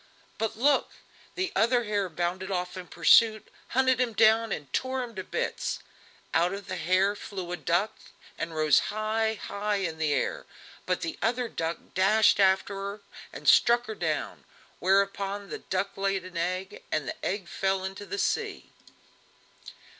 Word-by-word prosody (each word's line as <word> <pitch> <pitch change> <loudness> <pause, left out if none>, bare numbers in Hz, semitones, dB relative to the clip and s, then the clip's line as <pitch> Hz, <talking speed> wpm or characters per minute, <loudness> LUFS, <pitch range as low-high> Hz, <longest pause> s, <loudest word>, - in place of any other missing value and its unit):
But 220 -1 -2
look! 275 +3 +2 0.4
the 375 0 -1
other 240 +2 +3
hare 205 -3 -1
bounded 175 +3 -2
off 180 -1 -2
in 185 -1 -7
pursuit, 215 +7 +5 0.2
hunted 260 -1 +2
him 240 -2 0
down 220 +1 +4
and 140 -4 -5
tore 260 0 -1
him 235 -2 -8
to 190 -3 -5
bits; - - -2 0.6
out 175 +4 +2
of 200 -1 -8
the - - -4
hare 190 +4 +2
flew 185 -4 -6
a - - -1
duck 175 +6 +1 0.4
and 165 -1 -5
rose 155 -1 +5
high, 220 +1 0
high 210 0 -2
in 170 -5 -2
the 155 -2 +1
air, - - -1 0.4
but - - 0
the 330 - -4
other 240 +2 +1
duck 165 -5 -3 0.2
dashed 210 +3 +4
after 195 +2 +3
her, 200 +1 -5 0.3
and - - -9
struck 240 +1 +6
her 220 - -5
down, - - -3 0.4
whereupon 200 +1 +1
the - - -4
duck 190 +1 -2
laid 195 -1 -1
an 185 -1 -11
egg, 185 +4 -3
and 150 -4 -1
the - - -6
egg 190 -1 -2
fell 190 +1 -1
into 195 +1 -6
the 405 - -4
sea. - - -2
195 Hz, 165 wpm, -28 LUFS, 185-220 Hz, 0.6 s, struck